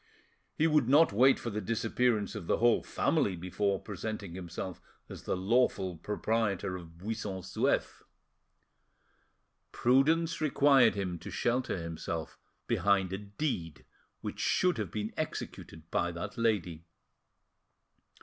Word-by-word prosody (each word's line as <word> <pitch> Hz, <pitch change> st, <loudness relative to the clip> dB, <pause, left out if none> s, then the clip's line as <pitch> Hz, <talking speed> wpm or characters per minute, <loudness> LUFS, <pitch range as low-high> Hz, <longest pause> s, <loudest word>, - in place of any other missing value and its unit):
He 155 Hz, -, +2 dB
would 150 Hz, -6 st, +3 dB
not 145 Hz, -4 st, +6 dB
wait 130 Hz, +6 st, +5 dB
for 120 Hz, -, -5 dB
the 105 Hz, +1 st, -3 dB
disappearance 115 Hz, 0 st, 0 dB
of 85 Hz, -, -7 dB
the -, -, +2 dB
whole 120 Hz, 0 st, +4 dB
family 95 Hz, -, 0 dB
before 95 Hz, +3 st, -1 dB
presenting 105 Hz, -2 st, -5 dB
himself 90 Hz, 0 st, -6 dB, 0.3 s
as -, -, -8 dB
the -, -, -1 dB
lawful 95 Hz, -2 st, +1 dB
proprietor, 105 Hz, +1 st, -1 dB
of 85 Hz, -2 st, -10 dB
Buisson 100 Hz, 0 st, -4 dB
Souef. 95 Hz, +1 st, 0 dB, 1.7 s
Prudence 155 Hz, +7 st, +2 dB
required 140 Hz, -6 st, +5 dB
him 90 Hz, -4 st, -3 dB
to -, -, -8 dB
shelter 125 Hz, -2 st, 0 dB
himself 85 Hz, -1 st, -5 dB, 0.3 s
behind 100 Hz, -2 st, +2 dB
a 95 Hz, -, -3 dB
deed 100 Hz, -, -4 dB, 0.4 s
which -, -, -5 dB
should 180 Hz, -9 st, +2 dB
have 105 Hz, -5 st, -2 dB
been 105 Hz, +3 st, -4 dB
executed 115 Hz, -, -5 dB
by 85 Hz, -, +1 dB
that 90 Hz, +4 st, -6 dB
lady. 100 Hz, -9 st, 0 dB
105 Hz, 125 wpm, -31 LUFS, 90-120 Hz, 1.7 s, not